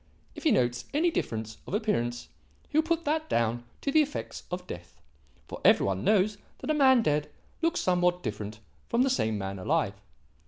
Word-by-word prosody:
If - - -10
he 310 - +5
notes 120 -1 +1
any 335 +3 +3
difference 110 - -3
of - - -2
appearance 120 - -1 0.4
he - - -11
will - - +7
put 335 +1 -1
that 315 +1 0
down 120 +1 0 0.2
to 280 - -1
the 310 - +6
effects 295 -1 -4
of 180 0 -4
death; 85 - -9 0.5
for - - -8
every - - +6
one 95 0 -1
knows 210 0 +3 0.2
that - - -2
a - - +3
man 260 -5 +5
dead 150 -4 +1 0.3
looks 335 +1 +1
somewhat 180 0 +2
different 105 -1 -5 0.3
from 235 +2 +3
the 270 - +2
same 110 - +1
man 95 -1 -4
alive. 90 - +1
180 Hz, 190 wpm, -28 LUFS, -, 0.5 s, will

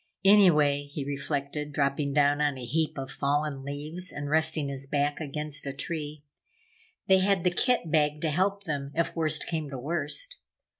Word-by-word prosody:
Anyway, 150 -8 +5
he 145 -2 -4
reflected, 145 +1 -3
dropping 140 0 0
down 145 0 +3
on 145 -2 +1
a 125 - -6
heap 155 +6 -1
of 135 -1 -5
fallen 145 -1 -1
leaves 150 +6 -4
and 145 0 -5
resting 160 -1 +3
his 135 0 -4
back 145 +1 0
against 150 -1 -3
a 135 - -3
tree, 150 0 -5 0.8
they 190 0 +5
had 190 -2 +2
the 180 - +3
kit 230 - +1
bag 150 -2 +2
to 155 0 -1
help 195 +5 0
them, 145 -6 -3
if 170 0 0
worst 155 -2 +1
came 155 -3 -3
to 135 - -6
worst. 165 - -3
150 Hz, 170 wpm, -28 LUFS, 140-165 Hz, 0.8 s, Anyway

